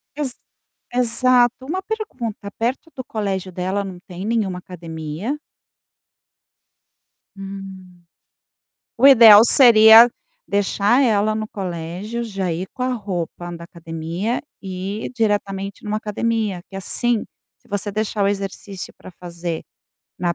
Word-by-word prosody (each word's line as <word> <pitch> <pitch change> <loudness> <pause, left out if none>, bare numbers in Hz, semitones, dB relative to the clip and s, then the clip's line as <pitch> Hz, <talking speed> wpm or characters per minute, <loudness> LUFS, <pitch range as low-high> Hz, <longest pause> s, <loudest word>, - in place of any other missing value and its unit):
Ex 275 -5 -3 0.6
exato, 245 +1 +2
uma 370 +6 -3
pergunta, 255 - -5
perto 255 +8 -2
do 260 -2 -6
colégio 195 -4 -3
dela 185 +3 -2
não 185 -2 -8
tem 180 +1 -8
nenhuma 210 -5 -1
academia? 170 - -6 2.0
Hum. 195 -2 -10 0.9
O 255 - +5
ideal 230 -6 +10
seria 230 -2 +8 0.4
deixar 205 +5 +2
ela 215 -3 +2
no 215 0 -3
colégio, 185 +4 -5
já 195 -6 -3
ir 180 +3 -4
com 255 - -6
a 255 0 0
roupa 180 -6 -4
da 170 - -10
academia 170 +6 -4 0.2
e 190 +2 -5
ir - - -8
diretamente 200 -3 -2
em - - -6
uma 210 - 0
academia 215 -2 -2
que 195 - -9
assim, 225 +4 0 0.3
se - - -28
você 205 +1 -2
deixar 210 0 -1
o - - +3
exercício 195 -1 -5
para - - -12
fazer 170 -1 -6 0.6
na 175 -1 0
205 Hz, 125 wpm, -21 LUFS, 185-230 Hz, 2.0 s, ideal